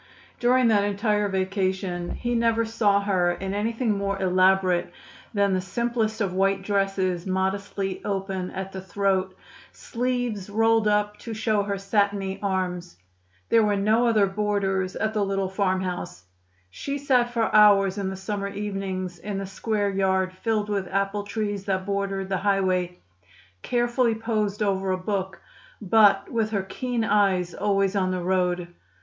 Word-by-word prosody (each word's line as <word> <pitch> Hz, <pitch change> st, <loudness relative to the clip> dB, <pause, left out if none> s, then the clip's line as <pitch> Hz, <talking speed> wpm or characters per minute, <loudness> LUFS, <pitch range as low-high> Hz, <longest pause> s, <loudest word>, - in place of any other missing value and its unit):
During 250 Hz, 0 st, +4 dB
that 205 Hz, -2 st, +3 dB
entire 205 Hz, 0 st, 0 dB
vacation 190 Hz, -2 st, -2 dB
he 240 Hz, 0 st, -2 dB
never 230 Hz, -1 st, +2 dB
saw 210 Hz, -3 st, +2 dB
her 185 Hz, -3 st, +1 dB
in 190 Hz, +2 st, -5 dB
anything 225 Hz, +3 st, -1 dB
more 200 Hz, 0 st, -2 dB
elaborate 185 Hz, -1 st, +2 dB, 0.4 s
than 200 Hz, -2 st, +2 dB
the 185 Hz, -, +1 dB
simplest 225 Hz, +3 st, -1 dB
of 195 Hz, -3 st, 0 dB
white 195 Hz, +1 st, +1 dB
dresses 195 Hz, -3 st, 0 dB
modestly 190 Hz, +1 st, -2 dB
open 195 Hz, -2 st, -3 dB
at 190 Hz, 0 st, -6 dB
the 190 Hz, -, -6 dB
throat, 190 Hz, -1 st, -1 dB, 0.3 s
sleeves 245 Hz, -5 st, -3 dB
rolled 225 Hz, +1 st, +3 dB
up 210 Hz, 0 st, +1 dB
to 230 Hz, -2 st, -6 dB
show 215 Hz, -1 st, +1 dB
her 200 Hz, 0 st, -2 dB
satiny 195 Hz, -1 st, 0 dB
arms. 180 Hz, -, -2 dB, 0.5 s
There 230 Hz, -, +5 dB
were 210 Hz, -1 st, +2 dB
no 215 Hz, +4 st, +2 dB
other 215 Hz, -3 st, +4 dB
boarders 195 Hz, -2 st, -1 dB
at 220 Hz, 0 st, -1 dB
the 210 Hz, -2 st, +1 dB
little 195 Hz, -1 st, -1 dB
farmhouse. 185 Hz, -, -2 dB, 0.5 s
She 280 Hz, -, -4 dB
sat 255 Hz, -4 st, +2 dB
for 230 Hz, -2 st, 0 dB
hours 200 Hz, -2 st, +6 dB
in 195 Hz, -1 st, -2 dB
the 190 Hz, -, -5 dB
summer 200 Hz, +1 st, -4 dB
evenings 195 Hz, -3 st, -4 dB
in 205 Hz, +1 st, -4 dB
the 195 Hz, -, -3 dB
square 205 Hz, +1 st, -1 dB
yard 190 Hz, -1 st, +1 dB
filled 215 Hz, +2 st, -1 dB
with 200 Hz, -3 st, -1 dB
apple 195 Hz, +1 st, -1 dB
trees 205 Hz, -1 st, -3 dB
that 190 Hz, -1 st, -1 dB
bordered 195 Hz, -1 st, -2 dB
the 190 Hz, -, 0 dB
highway, 185 Hz, -3 st, 0 dB, 0.6 s
carefully 240 Hz, -, +1 dB
posed 215 Hz, -2 st, -1 dB
over 195 Hz, -1 st, 0 dB
a 185 Hz, -, +1 dB
book, 190 Hz, 0 st, -3 dB, 0.4 s
but 210 Hz, 0 st, +4 dB
with 225 Hz, -2 st, 0 dB
her 200 Hz, -3 st, -1 dB
keen 240 Hz, +4 st, -3 dB
eyes 195 Hz, -5 st, +2 dB
always 195 Hz, -1 st, +1 dB
on 185 Hz, -2 st, +1 dB
the 185 Hz, -1 st, -2 dB
road. 180 Hz, -1 st, 0 dB
200 Hz, 155 wpm, -25 LUFS, 190-210 Hz, 0.6 s, hours